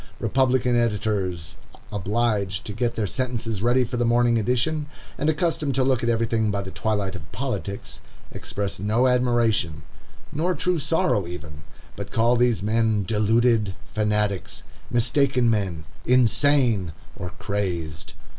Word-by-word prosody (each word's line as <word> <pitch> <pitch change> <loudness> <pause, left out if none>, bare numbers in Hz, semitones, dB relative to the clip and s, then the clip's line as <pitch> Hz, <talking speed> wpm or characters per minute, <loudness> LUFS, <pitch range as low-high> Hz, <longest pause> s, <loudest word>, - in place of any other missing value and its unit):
Republican 130 -2 +2
editors, 100 -8 -1 0.3
obliged 105 -1 -1
to 105 - -5
get 120 +2 -1
their 110 - 0
sentences 115 -3 -2
ready 120 +3 +3
for 125 +1 -4
the 120 - +1
morning 120 0 +3
edition, 125 +7 0 0.3
and 150 - 0
accustomed 155 -3 0
to 130 - +2
look 130 -2 +2
at 120 - 0
everything 115 -1 +1
by 100 0 -1
the 95 -1 -5
twilight 105 -3 -1
of 75 -4 -10
politics, 105 -4 -4 0.3
express 100 -3 -4
no 110 +6 +2
admiration, 120 - +2 0.5
nor 175 +5 0
true 180 -2 0
sorrow 160 - +1
even, 80 -4 -8 0.3
but - - -6
call 115 +2 +3
these 120 -4 +2
men 110 -1 +2
"deluded 110 0 +2 0.2
fanatics"—"mistaken 115 +5 0
men"—"insane," 110 - +1 0.2
or 90 - -5
"crazed." 85 -6 -3
115 Hz, 125 wpm, -24 LUFS, 100-125 Hz, 0.5 s, ready